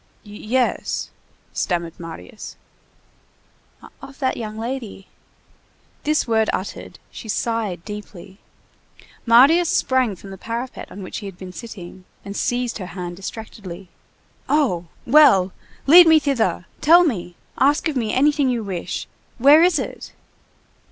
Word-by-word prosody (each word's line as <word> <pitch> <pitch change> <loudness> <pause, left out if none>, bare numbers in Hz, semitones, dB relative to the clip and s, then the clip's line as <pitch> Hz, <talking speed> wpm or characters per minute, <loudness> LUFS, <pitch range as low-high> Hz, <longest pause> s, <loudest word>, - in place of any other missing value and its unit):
"Yes!" 215 +4 -2 0.4
stammered 170 -2 -2
Marius. 165 +5 -9 1.5
"Of 270 - -11
that 260 -2 0
young 215 -1 -6
lady." 230 -4 -6 1.0
This 305 -2 +1
word 220 -1 +2
uttered, 190 - -6
she 220 - -10
sighed 215 -6 -2
deeply. 205 -2 -9 0.9
Marius 285 +9 +6
sprang 255 -6 +1
from 195 +2 -12
the 190 - -10
parapet 235 +4 -6
on 200 - -8
which 185 - -6
he 205 - -7
had 190 -2 -10
been 185 -1 -9
sitting 190 -4 -10 0.2
and 200 0 -7
seized 245 0 -1
her 185 - -6
hand 175 -1 -5
distractedly. 195 -3 -8 0.6
"Oh! 235 - +1 0.2
Well! 215 -10 +5 0.3
lead 340 +4 +9
me 320 -1 +7
thither! 240 - 0 0.2
Tell 340 +4 +7
me! 180 - -2 0.2
Ask 285 +5 +3
of 310 - -3
me 225 -4 -1
anything 285 +1 +2
you 240 -3 -1
wish! 190 -4 -4 0.3
Where 285 +5 +7
is 350 -1 +4
it?" 265 - -6
225 Hz, 130 wpm, -21 LUFS, 190-270 Hz, 1.5 s, lead